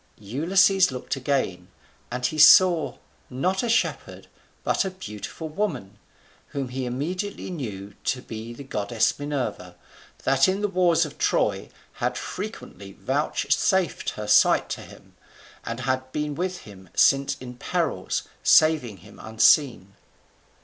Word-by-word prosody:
Ulysses 180 - +3
looked 130 +2 -4
again; 130 -10 -2 0.4
and 125 +1 -3
he 155 +4 -1
saw, 170 +1 +6 0.3
not 180 +9 -1
a 240 - -2
shepherd, 230 - -1 0.4
but - - +1
a 190 - -2
beautiful 160 - -8
woman, 150 - -4 0.5
whom 135 -3 -4
he 130 0 -4
immediately 180 +11 -4
knew 105 - -6
to 125 -1 -1
be 110 +1 -7
the 120 +4 -9
goddess 110 -2 -1
Minerva, 145 -3 -4 0.5
that 135 0 +3
in 190 +2 0
the 210 - +1
wars 175 -3 +2
of 150 - -11
Troy - - 0 0.2
had - - -2
frequently 100 0 -7
vouchsafed 155 - 0
her 105 - -5
sight 105 - +4
to - - -4
him; - - -15 0.5
and 115 +2 -5
had 130 0 -2
been 150 +1 -2
with 180 +3 -3
him 95 -3 -14
since 140 0 +3
in 125 -1 -9
perils, - - -2 0.2
saving 155 -10 +4
him - - -15
unseen. 110 -2 +3
135 Hz, 135 wpm, -24 LUFS, 115-175 Hz, 0.5 s, saw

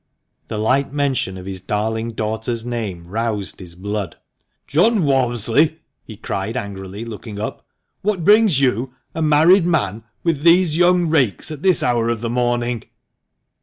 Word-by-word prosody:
The 110 - -4
light 130 +6 +1
mention 135 -10 -1
of 90 - -9
his 95 -1 -5
darling 110 +4 -2
daughter's 110 +2 -3
name 110 -8 -4
roused 105 -1 -2
his 85 -2 -8
blood. 100 0 -4 0.3
" - - -51
John 190 +6 +3
Walmsley," 135 +2 +2 0.3
he 110 - -11
cried 100 +2 -3
angrily, 100 -1 -6
looking 110 -2 -8
up, 110 - -5 0.2
" - - -52
what 195 -5 -1
brings 210 -8 +5
you, 130 -1 0 0.2
a 160 - -3
married 160 +4 +5
man, 115 - 0 0.2
with 165 -4 0
these 170 0 +4
young 175 0 +4
rakes 135 - +1
at 150 -2 -7
this 185 -3 +3
hour 120 -2 +1
of 115 -2 -2
the 115 -1 -2
morning 120 -1 -1
120 Hz, 160 wpm, -20 LUFS, 105-150 Hz, 0.3 s, brings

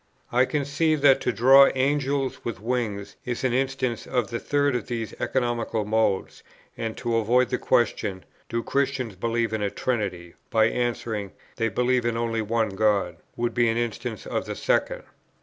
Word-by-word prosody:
I 125 +2 +4
conceive 150 +2 0
that 135 -2 +5
to - - +1
draw 135 +4 +7
Angels 135 0 0
with 115 -5 -4
wings 110 -3 -3
is 120 0 -4
an 130 -2 +1
instance 130 -2 -1
of 125 -3 -1
the 115 - -2
third 145 -2 +1
of 120 - -3
these 115 -3 -4
economical 120 -4 -1
modes; 110 -2 0 0.3
and 115 -1 -4
to 120 -1 0
avoid 120 +3 +3
the 125 - 0
question, 110 -6 0 0.2
"Do 115 0 -2
Christians 135 -6 -1
believe 115 +2 -1
in 110 - -1
a 100 - 0
Trinity?" 95 -8 -3 0.2
by 110 -1 +4
answering, 115 -4 -2 0.2
"They 115 -1 +1
believe 125 +3 +1
in 120 -1 0
only 115 -1 -1
one 110 +1 0
God," 100 -4 +1 0.2
would 120 0 -1
be 120 -2 +3
an 115 - 0
instance 120 -1 -3
of - - -2
the - - -4
second. - - 0
120 Hz, 170 wpm, -25 LUFS, 110-130 Hz, 0.3 s, draw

